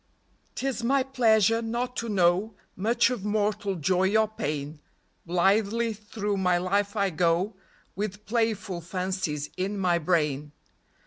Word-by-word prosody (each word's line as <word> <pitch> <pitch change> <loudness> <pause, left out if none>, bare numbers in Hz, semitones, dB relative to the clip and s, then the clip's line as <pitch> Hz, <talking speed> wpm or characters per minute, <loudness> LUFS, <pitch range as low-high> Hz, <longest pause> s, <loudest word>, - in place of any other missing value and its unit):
'T - - -4
is 260 -3 -2
my 265 +3 +3
pleasure 230 -4 +3
not 240 +2 -3
to 230 -1 -3
know 190 +2 +2 0.2
Much 225 +6 +2
of 240 -6 -4
mortal 210 -1 0
joy 185 +5 +2
or 220 0 +3
pain; 150 -7 -4 0.5
Blithely 205 +6 +2
through 210 -1 -3
my 180 -2 +2
life 200 +3 0
I 200 -2 +1
go 175 +5 +1 0.4
With 210 +1 -4
playful 215 -5 -1
fancies 180 -4 -3
in 195 +3 -2
my 180 -3 +2
brain. 150 -4 0
200 Hz, 135 wpm, -27 LUFS, 180-220 Hz, 0.5 s, my